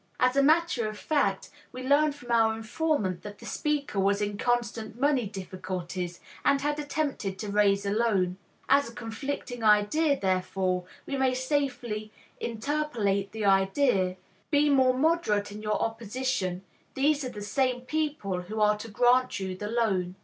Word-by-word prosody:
As 255 +1 +3
a 275 - +5
matter 305 -6 +3
of 215 - -8
fact, 205 -8 0 0.2
we 255 0 -7
learn 290 +3 +4
from 245 -4 -9
our 225 -1 +4
informant 225 - -1
that 205 -1 -9
the - - -13
speaker 290 -8 -1
was 200 +1 +2
in 205 0 -1
constant 235 0 -1
money 275 -5 +2
difficulties, 185 -2 -5 0.2
and 280 - +3
had 295 +1 -1
attempted 285 -10 -2
to 210 +1 -5
raise 200 -1 +3
a 200 - 0
loan. 200 -5 +1 0.3
As 280 -3 +4
a 230 - -14
conflicting 245 +1 -5
idea, 220 +8 +3
therefore, 185 -1 0 0.2
we 275 - -3
may 260 -1 +2
safely 255 -6 -2 0.3
interpolate 225 -6 -1
the 220 0 -3
idea, 195 0 +3 0.3
"Be 290 0 +3
more 260 -2 +4
moderate 265 -10 +1
in 210 +1 -8
your 215 0 -1
opposition, 225 -4 -2 0.3
these 290 +2 +2
are 255 - -3
the 210 -3 -7
same 250 +3 0
people 255 -9 -2
who 210 +5 -6
are 210 0 +4
to 230 - -7
grant 245 +2 +3
you 190 -1 -3
the 210 +3 -5
loan." 195 -6 0
225 Hz, 160 wpm, -28 LUFS, 200-275 Hz, 0.3 s, a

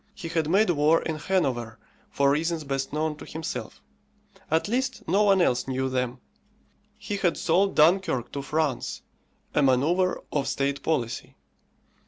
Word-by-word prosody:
He 170 -5 -7
had 160 -2 0
made 195 +2 +4
war 155 +1 +3
in 160 -1 -3
Hanover 125 - -1 0.3
for 140 0 +2
reasons 160 +2 0
best 135 -1 -3
known 155 0 -1
to - - -10
himself; 160 +1 -6 0.7
at 160 +4 +1
least, 255 +3 -2
no 195 +5 +3
one 195 -3 +4
else 125 -5 +1
knew 130 0 -1
them. 125 -1 -2 0.8
He 205 -1 -4
had 175 -5 +1
sold 190 +4 +2
Dunkirk 160 - +3
to 140 - -4
France, 150 -2 -2 0.5
a - - +3
manoeuvre 150 +8 +2
of 140 -2 -1
state 140 0 -1
policy. 125 -8 -2
155 Hz, 150 wpm, -26 LUFS, 135-180 Hz, 0.8 s, made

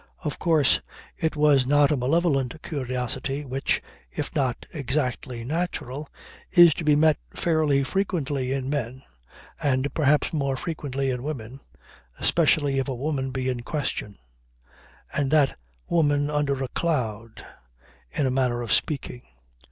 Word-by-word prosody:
Of 150 -4 -3
course 160 -5 +3 0.3
it 160 -1 -1
was 145 -4 +4
not 145 +1 +4
a - - +3
malevolent 140 0 +1
curiosity 135 -2 -3
which, 135 +1 -1 0.3
if 150 - -5
not 130 -5 -1
exactly 130 -4 -2
natural, 150 -1 -3 0.4
is 175 -3 +8
to 165 - -5
be 150 -1 +4
met 155 0 +4 0.2
fairly 155 -5 +2
frequently 145 -7 -1
in 135 -1 -2
men 130 -2 -3 0.6
and 135 0 +1
perhaps 150 0 +2
more 140 -3 0
frequently 140 -4 -2
in 125 -1 -3
women 135 -3 -6 0.6
especially 150 -4 +3
if 135 - -1
a 135 - -2
woman 135 0 -2
be 130 0 -3
in 125 -2 -1
question; 125 -7 -3 1.0
and 140 -1 0
that 145 -2 +3 0.3
woman 145 -3 +2
under 140 -2 0
a - - -2
cloud, 115 -9 -2 0.6
in 140 - -1
a 130 - +1
manner 125 -2 +1
of 115 - 0
speaking. 135 -4 0
140 Hz, 135 wpm, -25 LUFS, 130-150 Hz, 1.0 s, is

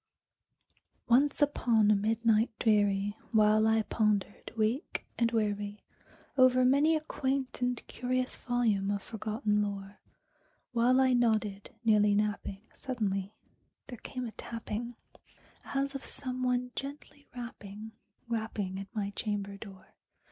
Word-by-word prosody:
Once 275 +4 +4
upon 230 -7 +3
a - - +5
midnight 225 +2 +2
dreary, 205 -2 +2 0.2
while 215 -1 +5
I 220 0 +3
pondered, 210 -2 0
weak 225 +7 -1
and 230 -1 +3
weary, 205 -2 -1 0.5
Over 255 -1 +5
many 285 +5 +4
a 310 - 0
quaint 270 -4 -2
and 245 0 +1
curious 255 +1 -2
volume 225 -5 0
of 200 -1 -1
forgotten 215 -1 -1
lore, 200 0 -4 0.7
While 245 +2 +4
I 260 -1 +4
nodded, 220 -2 0
nearly 210 -2 +5
napping, 205 -1 -1
suddenly 205 -5 -3 0.5
there 245 -4 -8
came 255 -1 -5
a 230 - -5
tapping, 230 +1 -5 0.7
As 275 0 -1
of 275 - -5
some 255 -2 -4
one 250 0 0
gently 285 +1 -7
rapping, 220 -3 -8 0.4
rapping 220 -4 -3
at 195 +2 -9
my 200 -2 -1
chamber 200 -1 -3
door. 195 -2 -12
220 Hz, 125 wpm, -31 LUFS, 205-250 Hz, 0.7 s, a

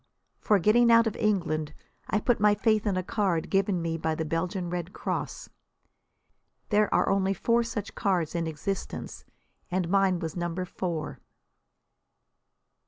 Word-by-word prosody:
For 210 - +3
getting 230 +5 +4
out 230 0 +6
of 220 - -1
England 165 -8 0 0.3
I 210 - +2
put 240 +2 +1
my 210 0 +4
faith 215 -1 +1
in 195 -3 +1
a 185 - -1
card 185 -5 -1
given 195 -3 +1
me 165 0 -2
by 160 0 -1
the 160 - -3
Belgian 175 +3 -2
Red 180 0 -4
Cross. - - -4 1.2
There 210 0 +3
are - - +2
only 195 0 +1
four 235 +5 +2
such 225 -3 -4
cards 180 -6 0
in 170 -1 -1
existence, 160 +5 -5 0.4
and 180 -2 -1
mine 195 -1 +3
was 165 -2 -5
number 175 +1 -2
four. 155 -7 -4
185 Hz, 150 wpm, -27 LUFS, 165-210 Hz, 1.2 s, out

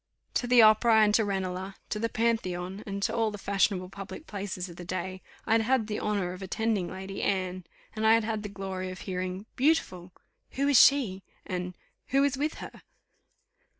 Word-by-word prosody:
To 245 - 0
the 245 -2 +7
Opera 220 +1 +6
and 210 -1 +4
to 220 - +4
Ranelagh, 190 -1 -3
to 210 - -2
the 230 +1 -1
Pantheon, 195 -4 -1
and 200 0 -4
to - - 0
all 225 -2 +2
the 210 - -7
fashionable 195 -2 0
public 200 +10 -9
places 195 - -5
of 170 -1 -12
the 180 - -7
day, 185 +1 -4 0.2
I - - -3
had 225 0 +5
had 240 0 +2
the 210 -1 -3
honour 200 -4 -1
of 185 - -10
attending 205 -1 -1
Lady 190 +1 -6
Anne; 185 -2 -1 0.3
and 220 0 +1
I 220 - +7
had 230 - +2
had 220 -1 -2
the 205 - -6
glory 190 -2 -5
of 185 -1 -8
hearing 185 +1 -4
"Beautiful!" 220 - +1 0.4
"Who 275 +1 0
is 285 -3 +8
she?" 235 -10 +3 0.2
and 180 0 -4 0.3
"Who 275 +1 +3
is 280 -2 +2
with 295 +4 -1
her?" - - -10
200 Hz, 195 wpm, -28 LUFS, 185-225 Hz, 0.4 s, is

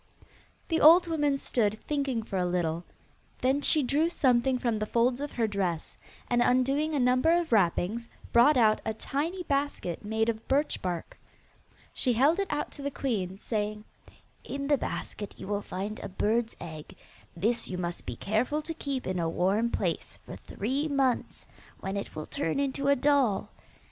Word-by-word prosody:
The 325 - +1
old 335 +4 +8
woman 295 -4 +1
stood 220 -5 0
thinking 275 -6 -1
for 200 -3 -4
a 180 - +1
little: 170 -1 -1 0.6
then 265 +3 +2
she 305 0 +3
drew 295 +6 +2
something 260 -5 +2
from 235 -3 -1
the 215 - -2
folds 245 +4 +1
of 290 - -4
her 230 - +1
dress, 190 -6 -2 0.3
and, 240 0 +2
undoing 275 +6 +2
a - - +1
number 255 +5 +3
of 340 -5 -4
wrappings, 215 +3 +1 0.2
brought 260 +5 +6
out 215 -3 +4
a 220 - -2
tiny 325 +10 -3
basket 280 - -2
made 220 +1 0
of 225 -1 -2
birch 285 +3 +1
bark. 175 -3 -4 0.7
She 250 - +1
held 280 - +3
it 395 - 0
out 295 - -2
to - - -10
the 280 - -1
queen, 200 -10 -2
saying, 210 0 -3 0.6
'In 280 0 -4
the 290 - +4
basket 205 - -5
you - - -8
will 205 0 -1
find 200 +2 -5
a - - -6
bird's 220 +4 0
egg. 160 -3 -9 0.4
This 225 +7 0
you 180 - -4
must 175 -1 -4
be 120 - -3
careful 240 - -1
to 330 - -4
keep 280 -5 -4
in 185 -1 -2
a 165 -1 0
warm 195 +7 +1
place - - -2
for - - -8
three 270 +9 -3
months, 270 -4 0 0.3
when 190 +1 -4
it 200 - -5
will 155 - -5
turn 165 +11 -1
into 275 0 -1
a 280 - +5
doll. 275 -7 +2
240 Hz, 180 wpm, -29 LUFS, 205-280 Hz, 0.7 s, old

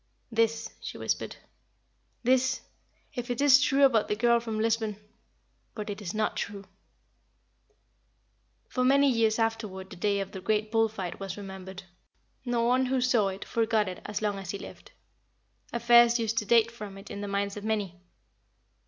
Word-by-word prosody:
"This," 225 0 0
she - - -6
whispered, - - -2 0.9
"this 260 +1 +2 0.5
if 245 0 -5
it 245 - -2
is 280 -1 +7
true 280 -1 +4
about 230 -5 +3
the 210 - 0
girl 235 +2 +3
from 225 -2 -4
Lisbon; 220 -1 0 0.8
but 210 -1 -4
it 205 - -7
is 180 -4 -4
not 215 0 -1
true." 200 -1 -4 2.0
For 255 - -1
many 280 +2 +5
years 225 -2 +2
afterward 215 -4 -2
the - - -8
day 200 +2 0
of 195 0 -4
the 190 - -7
great 215 +2 0
bull 225 -1 +3
fight 190 -5 -6
was 195 -1 -5
remembered. 190 -1 -8 0.6
No 240 -2 0
one 255 +2 +3
who 260 0 +1
saw 245 -5 +3
it 195 0 -5
forgot 225 -2 +1
it 185 - -6
as 210 +1 -4
long 205 -2 0
as 190 -3 -8
he 200 - -3
lived. - - -11 0.8
Affairs 235 0 +5
used 230 -1 0
to 210 - -5
date 230 +1 +4
from 210 -4 -9
it 195 - -11
in 200 - -5
the 205 - -4
minds 200 0 -1
of 205 - -7
many. 205 -5 -2
220 Hz, 170 wpm, -28 LUFS, 200-235 Hz, 2.0 s, is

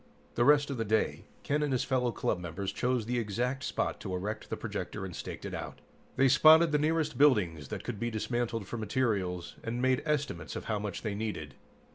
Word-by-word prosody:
The 120 - +2
rest 145 0 +5
of 135 - -3
the 115 - 0
day, 110 0 0 0.2
Ken 150 +1 0
and 150 -2 0
his 130 - +1
fellow 125 -2 +1
club 105 - -1
members 90 +3 -4
chose 125 -1 0
the 120 +1 0
exact 125 +5 -2
spot - - -1
to 95 - -4
erect 105 +4 -4
the - - -3
projector 95 - -4
and 90 -3 -7
staked - - -6
it - - -5
out. - - -5 0.4
They 135 - +5
spotted 155 +4 +7
the 150 - +3
nearest 155 0 0
buildings 90 - +3
that - - -5
could 110 -4 -5
be 120 - -1
dismantled 115 0 -2
for 120 - -4
materials, 100 -6 -1
and 115 +2 -3
made 130 0 +2
estimates 145 - -2
of - - -5
how 105 - -1
much 100 -3 -5
they 105 -3 -2
needed. 100 -10 -4
115 Hz, 210 wpm, -31 LUFS, 100-135 Hz, 0.4 s, spotted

